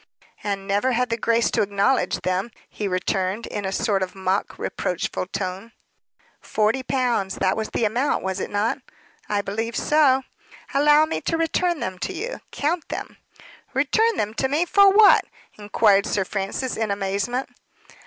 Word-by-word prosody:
"And 200 Hz, -1 st, -3 dB
never 205 Hz, +6 st, +1 dB
had 250 Hz, 0 st, 0 dB
the -, -, +2 dB
grace 230 Hz, +1 st, +1 dB
to 225 Hz, -, +1 dB
acknowledge 200 Hz, +5 st, +1 dB
them," 185 Hz, +4 st, -1 dB, 0.2 s
he 210 Hz, -, -4 dB
returned, 190 Hz, +3 st, -1 dB
in 205 Hz, -, -5 dB
a 190 Hz, -, -2 dB
sort 195 Hz, 0 st, 0 dB
of 185 Hz, 0 st, -3 dB
mock 190 Hz, +1 st, -1 dB
reproachful 180 Hz, +1 st, -3 dB
tone. 190 Hz, +4 st, -5 dB, 0.7 s
"Forty 220 Hz, +5 st, 0 dB
pounds. 245 Hz, -7 st, 0 dB
That 190 Hz, -1 st, +1 dB
was 220 Hz, -1 st, -3 dB
the 230 Hz, -, 0 dB
amount, 245 Hz, +7 st, 0 dB
was 190 Hz, 0 st, -2 dB
it -, -, -3 dB
not?" 205 Hz, +2 st, 0 dB, 0.5 s
"I 205 Hz, -1 st, 0 dB
believe 225 Hz, +4 st, -3 dB
so." 280 Hz, -3 st, +3 dB, 0.5 s
"Allow 295 Hz, +2 st, +5 dB
me 320 Hz, -, -3 dB
to 330 Hz, -, -1 dB
return 330 Hz, 0 st, 0 dB
them 185 Hz, -1 st, -4 dB
to 385 Hz, -, -3 dB
you. 450 Hz, +8 st, -5 dB
Count 320 Hz, +3 st, -2 dB
them." -, -, -6 dB, 0.6 s
"Return 435 Hz, -, +2 dB
them 210 Hz, +1 st, -1 dB
to 265 Hz, -, +2 dB
me 300 Hz, +6 st, +1 dB
for 400 Hz, +2 st, +6 dB
what?" 415 Hz, +1 st, +7 dB, 0.4 s
inquired 205 Hz, -1 st, +3 dB
Sir 195 Hz, -2 st, 0 dB
Francis, 200 Hz, +7 st, -3 dB
in 220 Hz, -1 st, -1 dB
amazement. 200 Hz, +6 st, -1 dB
220 Hz, 165 wpm, -23 LUFS, 195-270 Hz, 0.7 s, what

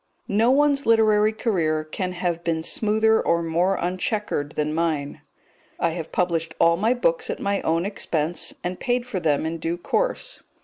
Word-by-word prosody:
No 220 Hz, +4 st, +2 dB
one's 280 Hz, 0 st, +3 dB
literary 215 Hz, -2 st, +4 dB
career 170 Hz, -9 st, 0 dB
can 180 Hz, +4 st, -4 dB
have 175 Hz, -1 st, -2 dB
been 165 Hz, -1 st, -1 dB
smoother 220 Hz, +4 st, +2 dB
or 170 Hz, 0 st, +1 dB
more 175 Hz, +4 st, +1 dB
unchequered 180 Hz, -4 st, -2 dB
than 150 Hz, 0 st, -1 dB
mine. 155 Hz, -3 st, -2 dB, 0.6 s
I -, -, +1 dB
have 165 Hz, -1 st, -6 dB
published 170 Hz, -2 st, -1 dB
all 170 Hz, 0 st, +5 dB
my 220 Hz, +8 st, +1 dB
books 170 Hz, -9 st, 0 dB
at -, -, -3 dB
my 200 Hz, 0 st, -1 dB
own 165 Hz, +2 st, 0 dB
expense, 170 Hz, -5 st, -1 dB
and 180 Hz, +1 st, -4 dB
paid 245 Hz, -1 st, 0 dB
for 225 Hz, -7 st, -3 dB
them 155 Hz, -3 st, +1 dB
in 165 Hz, +1 st, -3 dB
due 165 Hz, +2 st, -2 dB
course. -, -, -1 dB
180 Hz, 170 wpm, -23 LUFS, 165-215 Hz, 0.6 s, all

